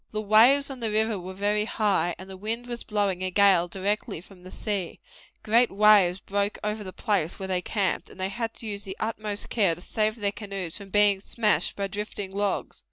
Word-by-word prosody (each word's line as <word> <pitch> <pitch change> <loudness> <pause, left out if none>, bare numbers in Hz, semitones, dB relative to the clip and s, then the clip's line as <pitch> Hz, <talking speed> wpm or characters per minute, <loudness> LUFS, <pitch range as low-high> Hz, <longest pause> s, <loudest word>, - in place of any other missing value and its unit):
The 215 - -3
waves 235 +7 +5
on 265 - -7
the 230 -2 -1
river 215 -1 +1
were 185 +1 -8
very 205 +2 +1
high, 200 -6 +1
and 185 +2 -10
the 190 - -9
wind 225 +5 -3
was 240 -1 -5
blowing 200 -4 -1
a 185 - -1
gale 190 -2 +4
directly 195 0 -2
from 185 +1 -16
the 185 - -11
sea; 200 -3 -3 0.4
great 230 +3 +4
waves 200 -3 +5
broke 200 +1 -1
over 210 0 -2
the 185 - -7
place 185 -5 -1
where 190 - -5
they 185 -1 0
camped, 195 0 -1
and - - -15
they 190 +1 -1
had 225 +2 -4
to - - -7
use 205 -1 -4
the 195 -1 -7
utmost 215 -1 -3
care 195 -8 +2
to 175 - -12
save 215 +3 0
their 205 -3 -1
canoes 195 -5 -5
from 200 -1 -6
being 205 -1 +4
smashed 210 -6 +1
by 200 - -2
drifting 205 0 -5
logs. 200 0 -2
205 Hz, 215 wpm, -26 LUFS, 190-215 Hz, 0.4 s, waves